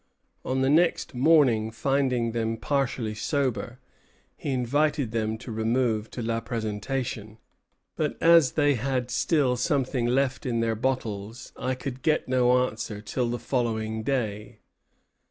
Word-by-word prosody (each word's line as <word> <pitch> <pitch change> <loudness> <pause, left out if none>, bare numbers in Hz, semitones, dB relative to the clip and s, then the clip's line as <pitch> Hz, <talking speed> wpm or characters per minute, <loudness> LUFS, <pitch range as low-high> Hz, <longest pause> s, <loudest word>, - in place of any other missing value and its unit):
On 130 0 -1
the 130 - +2
next 165 0 +2
morning, 125 -5 +4
finding 125 -1 0
them 115 0 -1
partially 125 -4 -1
sober, 125 0 -2 0.6
he - - -6
invited 140 +1 +1
them 110 -1 -1
to 120 +1 -9
remove 110 0 0
to 120 - -6
La 115 0 -1
Présentation; 110 0 -4 0.6
"but - - -1
as 165 -5 +5
they 145 -2 +3
had 125 0 -2
still 135 0 +2
something 130 -2 0
left 130 +1 +1
in 120 -3 -1
their 115 0 +1
bottles, 110 -2 -3
I 130 0 -2
could 130 0 -6
get 155 -1 +1
no 125 0 +3
answer 110 -3 -6
till 120 +3 -2
the 120 - -2
following 110 -4 -2
day." 110 -4 -2
125 Hz, 135 wpm, -26 LUFS, 110-135 Hz, 0.6 s, as